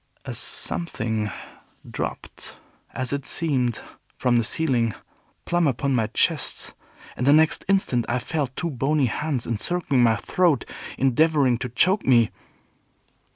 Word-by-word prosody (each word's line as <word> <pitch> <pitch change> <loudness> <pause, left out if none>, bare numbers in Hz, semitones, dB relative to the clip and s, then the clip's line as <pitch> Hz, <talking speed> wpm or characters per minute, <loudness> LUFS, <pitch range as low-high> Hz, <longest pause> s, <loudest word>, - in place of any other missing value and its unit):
A - - -5
Something 110 -10 -2 0.6
dropped, - - -7 0.3
as 130 +1 -3
it 140 -1 -3
seemed, 130 -8 0 0.4
from 125 -1 +2
the 115 - +2
ceiling, 120 -5 +2 0.5
plumb 175 -2 +1
upon 135 +1 0
my 115 -4 +1
chest, - - 0 0.4
and 125 - -2
the - - +7
next 155 +1 +3
instant 185 -12 +2
I 120 - +1
felt 135 0 -3
two 170 -2 -3
bony 140 +2 +1
hands 135 +1 -2
encircling 135 +4 0
my 115 -2 +4
throat, 170 - +1 0.3
endeavoring 135 -1 +2
to 125 - -4
choke 185 - +2
me. 120 -4 +4
130 Hz, 130 wpm, -23 LUFS, 120-160 Hz, 0.6 s, the